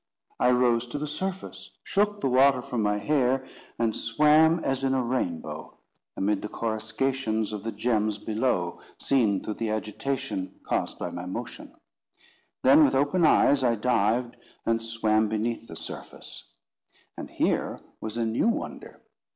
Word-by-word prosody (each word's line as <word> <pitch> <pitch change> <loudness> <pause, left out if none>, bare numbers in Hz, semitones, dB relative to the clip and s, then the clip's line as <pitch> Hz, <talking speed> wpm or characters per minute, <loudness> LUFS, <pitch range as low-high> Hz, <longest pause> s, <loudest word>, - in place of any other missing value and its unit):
I 125 - +4
rose 125 -1 +3
to 120 - -5
the 150 - -3
surface, 185 +6 -5
shook 205 +1 0
the - - +1
water 130 0 +4
from 120 -2 -2
my 105 0 +1
hair, 130 +3 +1 0.3
and 115 -2 0
swam 150 +7 +4
as 135 0 -1
in 135 0 +2
a 130 - +1
rainbow, 85 -11 -3 0.4
amid 100 +1 +1
the 105 - -5
coruscations 110 0 -1
of 105 - -4
the 115 - -3
gems 110 -3 0
below 105 -5 -1 0.2
seen 110 -8 +2
through 110 - -3
the 115 - 0
agitation 110 -2 -3
caused - - -2
by - - -4
my 90 +1 -6
motion. 120 +6 -7 0.9
Then, 140 +4 +7
with 135 -2 +3
open 145 +6 +3
eyes, 140 -2 +4
I 120 -2 +3
dived, 120 +1 +1 0.3
and 115 0 +1
swam 110 -1 +1
beneath 115 +1 -2
the 80 - -9
surface. - - -8 0.6
And - - -7
here - - 0 0.2
was 110 +1 -5
a 115 - +1
new 115 - +1
wonder. 230 - -4
120 Hz, 150 wpm, -27 LUFS, 110-135 Hz, 0.9 s, Then